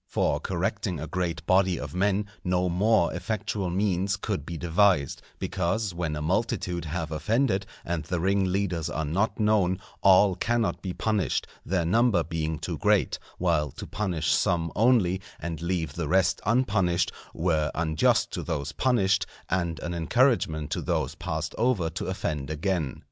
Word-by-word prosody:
For - - +1
correcting 85 -4 -2
a 80 - -4
great 85 +1 -3
body 95 -2 +3
of - - -6
men 100 +2 +1 0.2
no 90 0 +1
more 100 +1 +3
effectual 105 -3 -2
means 95 +1 0
could 95 -7 -3
be 85 - -4
devised; 85 -4 +2 0.2
because, 95 +2 -1
when 85 -3 -2
a 75 - -4
multitude 90 -1 -1
have 80 0 -3
offended 100 - +1 0.2
and 85 -2 -2
the 85 +3 -2
ringleaders 95 -2 0
are 80 - -2
not 95 +11 0
known, 105 -4 +3 0.2
all 95 0 +6
cannot 115 +5 0
be 95 - -3
punished, 105 0 0 0.2
their 90 -1 0
number 110 -1 +3
being 80 -1 -2
too - - -5
great; - - +2 0.2
while 80 -5 +1
to - - -7
punish 90 -7 -1
some 85 -2 +1
only, 105 -5 +3 0.2
and 80 -1 -5
leave 85 -4 -2
the 85 -1 -3
rest 95 +2 +2
unpunished, 95 -7 +2 0.2
were 80 -3 0
unjust 80 -2 +2
to - - -3
those 70 -3 -3
punished 105 -6 +2 0.2
and 85 -3 0
an 85 - -3
encouragement 85 - +1
to - - -1
those - - -1
passed - - -4
over 110 -9 +1
to 85 - -4
offend 75 -7 -3
again. 80 -3 -1
90 Hz, 155 wpm, -27 LUFS, 80-100 Hz, 0.2 s, all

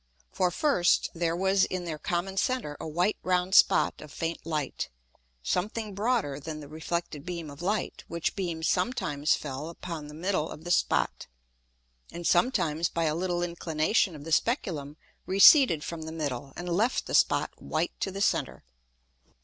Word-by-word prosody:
For, 180 - +1
first, 180 - +2
there 170 -1 0
was 190 +2 +3
in 185 -1 -4
their 155 -3 -4
common 180 +4 -2
center 210 -7 -1
a - - -5
white 175 +6 +1
round 180 0 0
Spot - - +5
of 150 - -11
faint 165 +2 -4
Light, 150 -4 -2 0.5
something 210 - -2
broader 205 - 0
than 155 +1 -6
the 145 - -9
reflected 160 0 -4
beam 170 -4 -5
of 140 +3 -11
Light, 205 +4 -2
which 170 -1 -2
beam 170 -4 -3
sometimes 180 - +1
fell 145 +2 -5
upon 165 -3 -7
the 150 - -10
middle 170 -1 -1
of 155 - -9
the 175 - -4
Spot, - - +1 0.8
and 170 0 -7
sometimes 170 - +2
by 165 - -1
a 155 -1 +1
little 175 +1 -1
inclination 170 +2 0
of 145 - -9
the 165 - -7
Speculum 155 - 0 0.3
receded 195 - +7
from 170 -1 -5
the 160 0 -6
middle, 140 -4 -4
and 175 - -6
left 205 +8 +1
the - - -6
Spot - - +3
white - - -2
to - - -1
the 195 +1 -5
center. - - 0
170 Hz, 165 wpm, -28 LUFS, 155-190 Hz, 0.8 s, receded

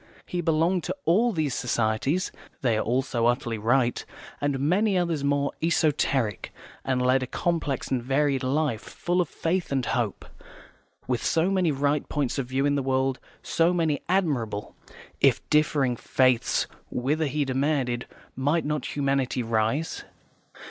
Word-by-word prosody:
He 180 - -3
belonged 165 +2 +1
to - - -2
all 225 +8 +3
these 155 - -1
societies 125 - 0 0.3
(they 120 -4 +2
are 110 - +1
all 125 +4 +1
so 120 -3 0
utterly 120 -2 0
right) 120 +3 +1 0.4
and 145 -2 0
many 185 +8 +2
others 170 -5 0
more 140 0 +1
esoteric, 145 - +1 0.3
and 130 -1 0
led 130 +1 +3
a 130 - -3
complex 160 -3 -2
and 130 -2 +1
varied 135 +1 +1
life, 130 -3 0
full 175 +1 -1
of 170 - -2
faith 175 0 -2
and 135 -3 0
hope. 115 -5 -2 0.8
With 125 -3 -1
so 165 +3 +2
many 185 -4 +2
right 140 +1 0
points 145 -2 -1
of 130 - -2
view 135 +2 0
in 145 - +2
the 140 - +1
world, 130 0 0 0.2
so 170 +2 +2
many 160 -4 +1
admirable, 130 - -1 0.4
if - - +3
differing, 145 -4 +3
faiths, 130 0 +2 0.2
whither, 150 +5 0
he 145 +1 0
demanded, 130 -2 0 0.3
might 145 +5 +1
not 150 -2 -2
humanity 135 -3 0
rise? 115 +7 -1
140 Hz, 150 wpm, -26 LUFS, 125-160 Hz, 0.8 s, all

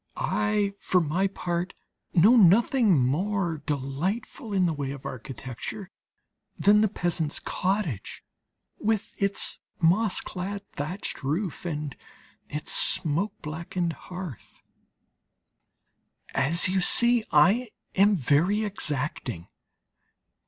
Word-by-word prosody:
I 205 -1 0
for 185 - +2
my 175 +4 +1
part 180 -1 -3 0.4
know 200 +8 +6
nothing 220 - +5
more 175 +3 -1
delightful 170 - -3
in 190 -2 +2
the 165 - +1
way 140 -3 -4
of 140 -1 -8
architecture 130 - -7 0.7
than 210 +1 +5
the 215 - +4
peasant's 170 -5 -2
cottage, 185 - -3 0.6
with 220 -1 -1
its 200 0 +1 0.2
moss 185 +5 +3
clad 200 +2 -5
thatched 160 +8 -5
roof 165 +6 -3
and 150 -4 -4 0.5
its 150 +1 -3
smoke 170 +7 +2
blackened 170 +2 -3
hearth. 180 - -9 1.7
As 150 +8 +4
you 190 0 +1
see, 235 +4 +5
I 195 +11 +4 0.2
am 200 +2 +4
very 170 - +2
exacting. 145 - -3
180 Hz, 105 wpm, -26 LUFS, 150-205 Hz, 1.7 s, know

